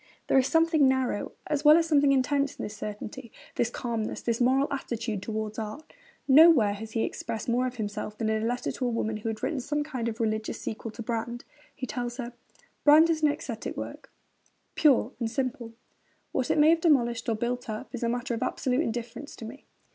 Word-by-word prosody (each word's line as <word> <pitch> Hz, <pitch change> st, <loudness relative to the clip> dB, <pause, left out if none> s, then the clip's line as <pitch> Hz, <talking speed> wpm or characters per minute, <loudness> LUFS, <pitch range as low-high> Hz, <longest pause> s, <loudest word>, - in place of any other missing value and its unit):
There -, -, +3 dB
is 260 Hz, -, +2 dB
something 325 Hz, -3 st, +4 dB
narrow 260 Hz, -5 st, 0 dB
as 295 Hz, -1 st, -1 dB
well 300 Hz, +1 st, +8 dB
as 335 Hz, -, +2 dB
something 290 Hz, -3 st, +4 dB
intense 275 Hz, +1 st, +1 dB
in -, -, -6 dB
this 210 Hz, -, -5 dB
certainty, 215 Hz, +4 st, -7 dB, 0.2 s
this 240 Hz, -, 0 dB
calmness, 230 Hz, -3 st, -3 dB
this 235 Hz, 0 st, -1 dB
moral 265 Hz, +3 st, +3 dB
attitude 235 Hz, -6 st, -3 dB
towards 215 Hz, +1 st, -4 dB
art. 220 Hz, +8 st, -7 dB, 0.3 s
Nowhere 275 Hz, -7 st, +7 dB
has 220 Hz, +2 st, -8 dB
he 225 Hz, -, +1 dB
expressed 220 Hz, -, -4 dB
more 250 Hz, +2 st, +1 dB
of 250 Hz, -, -6 dB
himself 210 Hz, -1 st, -4 dB
than 225 Hz, -, -1 dB
in 220 Hz, 0 st, +1 dB
a -, -, -1 dB
letter 245 Hz, +1 st, -2 dB
to 255 Hz, -, -3 dB
a -, -, +1 dB
woman 220 Hz, -2 st, -1 dB
who 215 Hz, +1 st, -4 dB
had 220 Hz, -, -5 dB
written 300 Hz, -4 st, -1 dB
some 295 Hz, +4 st, -1 dB
kind 255 Hz, -6 st, -3 dB
of 225 Hz, +1 st, -7 dB
religious 220 Hz, -1 st, -1 dB
sequel 225 Hz, +1 st, -5 dB
to 230 Hz, -, -7 dB
Brand. 235 Hz, +1 st, -4 dB, 0.3 s
He 255 Hz, -, -4 dB
tells 240 Hz, +1 st, -4 dB
her: 245 Hz, -2 st, -5 dB, 0.5 s
Brand 310 Hz, +3 st, +7 dB
is 315 Hz, -1 st, -1 dB
an 305 Hz, -, +5 dB
æsthetic 240 Hz, -5 st, -5 dB
work, -, -, -7 dB, 0.6 s
pure 265 Hz, -5 st, +4 dB
and 230 Hz, -2 st, -1 dB
simple. 245 Hz, -2 st, -3 dB, 0.6 s
What 255 Hz, -, -1 dB
it -, -, +2 dB
may 300 Hz, +1 st, +6 dB
have 330 Hz, 0 st, +2 dB
demolished 240 Hz, -8 st, +2 dB
or 225 Hz, -, +1 dB
built 245 Hz, +2 st, -3 dB
up 215 Hz, 0 st, -6 dB
is 245 Hz, -, -5 dB
a 235 Hz, -, 0 dB
matter 245 Hz, +1 st, -2 dB
of 230 Hz, -, -3 dB
absolute 255 Hz, +2 st, 0 dB
indifference 240 Hz, +2 st, -5 dB
to 225 Hz, -, -9 dB
me. 250 Hz, +6 st, -11 dB
240 Hz, 210 wpm, -28 LUFS, 225-275 Hz, 0.6 s, well